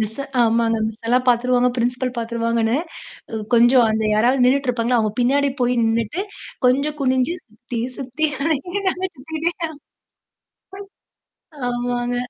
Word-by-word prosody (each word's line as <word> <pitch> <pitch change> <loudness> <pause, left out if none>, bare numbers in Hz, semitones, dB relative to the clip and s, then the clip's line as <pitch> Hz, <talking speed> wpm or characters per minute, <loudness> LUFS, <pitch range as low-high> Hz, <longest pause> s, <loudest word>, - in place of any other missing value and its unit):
Miss 220 +5 -2 0.2
ஆமாங்க. 230 0 +2
மிஸ்ஸலாம் 235 +3 0
பார்த்துருவாங்க, 250 +1 +3
principal 250 +1 -1
பார்த்துருவாங்கன்னு, 230 0 0 0.6
அ - - -3 0.2
கொஞ்சம் 240 +1 +6
அந்த 220 0 0
யாராவது 245 +4 +3
நின்னுட்டு 265 +1 +2
இருப்பாங்க, 240 0 -1
அவுங்க 215 -3 +1
பின்னாடி 275 +3 +2
போய் 245 0 +2
நின்னுட்டு, 225 - 0 0.4
கொஞ்சம் 280 +4 +1
குனிஞ்சு 260 +4 +1
சுத்தி, 235 +1 -7 0.2
சுத்தி 270 +4 -1 0.6
நாங்க 375 0 -1
சுத்திட்டே 315 +5 -3 0.2
அ. - - -9 2.0
ஆமாங்க. 245 0 -2
245 Hz, 115 wpm, -21 LUFS, 230-260 Hz, 2.0 s, கொஞ்சம்